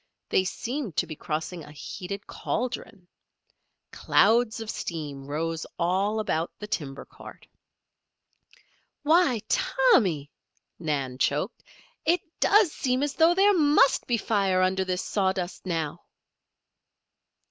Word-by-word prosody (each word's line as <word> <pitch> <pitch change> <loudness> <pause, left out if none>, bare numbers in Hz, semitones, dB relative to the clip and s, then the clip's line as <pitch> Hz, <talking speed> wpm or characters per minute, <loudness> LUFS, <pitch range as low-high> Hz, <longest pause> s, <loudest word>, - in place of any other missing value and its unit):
They 185 - +3
seemed 235 - -4
to - - +1
be 155 -2 -7
crossing 160 +3 -4
a 150 - -12
heated 190 +7 -7
cauldron. 225 -6 -4 0.8
Clouds 230 0 +3
of 225 -1 -4
steam 145 -5 -5
rose 160 +2 -2
all 190 +5 +1
about 165 -6 -1
the 210 - -7
timber 140 -9 -4
cart. - - -13 1.6
"Why, 310 -7 +4
Tommy!" 185 - +2 0.5
Nan 140 -6 -2
choked. 150 - 0 0.4
"It 345 +1 +2 0.2
does 410 -5 +5
seem 255 -1 0
as 290 -1 -1
though 330 +3 +4
there 400 +2 +5
must 295 -5 +4
be 240 - +2
fire 195 -4 +1
under 190 +1 +1
this 185 0 -2
sawdust 190 -2 -1
now." 160 -4 -2
190 Hz, 115 wpm, -26 LUFS, 160-245 Hz, 1.6 s, does